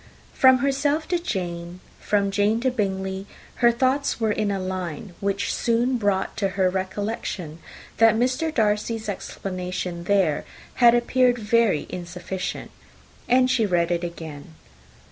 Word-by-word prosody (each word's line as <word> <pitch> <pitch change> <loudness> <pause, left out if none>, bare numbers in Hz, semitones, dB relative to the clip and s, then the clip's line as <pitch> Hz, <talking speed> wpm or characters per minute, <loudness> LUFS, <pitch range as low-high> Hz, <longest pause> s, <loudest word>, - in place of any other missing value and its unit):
From 260 -1 +6
herself 285 +3 0
to 350 -1 +1
Jane, 175 - -4 0.2
from 200 -1 +1
Jane 205 +3 +2
to 260 +1 +1
Bingley, 190 -3 -2 0.3
her 235 0 +5
thoughts 260 +4 0
were 220 -2 +1
in 210 0 0
a 200 -1 -1
line 185 -1 -5
which 200 0 -1
soon 240 +2 +1
brought 200 -3 0
to 195 -2 0
her 185 -1 +3
recollection 190 -3 -4 0.4
that 225 -1 +6
Mr. 255 +7 0
Darcy's 220 -2 0
explanation 180 -3 -4
there 190 -7 +2 0.4
had 240 0 +8
appeared 245 +1 +3
very 220 -6 +2
insufficient; 180 +1 -5 0.6
and 255 +1 +4
she 230 -5 +2
read 175 -2 +1
it 170 0 0
again. 160 -2 -8
205 Hz, 135 wpm, -24 LUFS, 185-235 Hz, 0.6 s, had